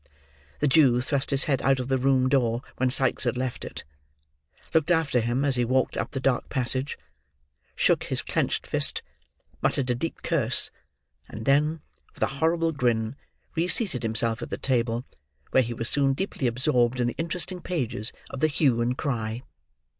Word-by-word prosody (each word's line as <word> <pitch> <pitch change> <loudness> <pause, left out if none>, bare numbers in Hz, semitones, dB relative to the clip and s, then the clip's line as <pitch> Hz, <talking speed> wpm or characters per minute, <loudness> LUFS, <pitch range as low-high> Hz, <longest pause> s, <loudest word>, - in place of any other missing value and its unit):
The 150 - +3
Jew 130 -4 +5
thrust 135 +2 -1
his 140 -1 +3
head 135 -4 0
out 135 +1 +2
of 125 - -3
the 135 -1 +1
room 130 0 +3
door 125 -3 +1
when 130 0 +2
Sikes 130 +1 +3
had 125 0 0
left 130 -1 -3
it; - - -7 0.9
looked 160 0 +2
after 160 -7 +2
him 120 +4 0
as 135 -3 +1
he 120 - +2
walked 130 +2 +1
up - - -2
the 135 - -4
dark 130 -2 0
passage; 130 +1 0 0.8
shook - - +2
his - - -1
clenched - - -1
fist; - - +1 0.6
muttered 130 -3 +1
a - - +3
deep 150 +7 -4
curse; - - +1 0.6
and 110 +1 -7
then, 150 +3 +2 0.3
with - - -2
a 135 +1 -3
horrible 165 0 +2
grin, 120 -4 0 0.4
reseated 170 - +2
himself 115 0 0
at - - -5
the - - -3
table; 120 -1 0 0.5
where 130 - +5
he 120 -1 -3
was 115 0 -2
soon 140 0 +2
deeply 140 -4 -2
absorbed 125 0 +1
in 120 - +2
the 120 - -2
interesting 180 +2 -4
pages 125 - -1 0.2
of 135 - -6
the 155 - +3
Hue 140 -6 +2
and 125 +2 0
Cry. 120 -4 -3
130 Hz, 175 wpm, -26 LUFS, 120-145 Hz, 0.9 s, Jew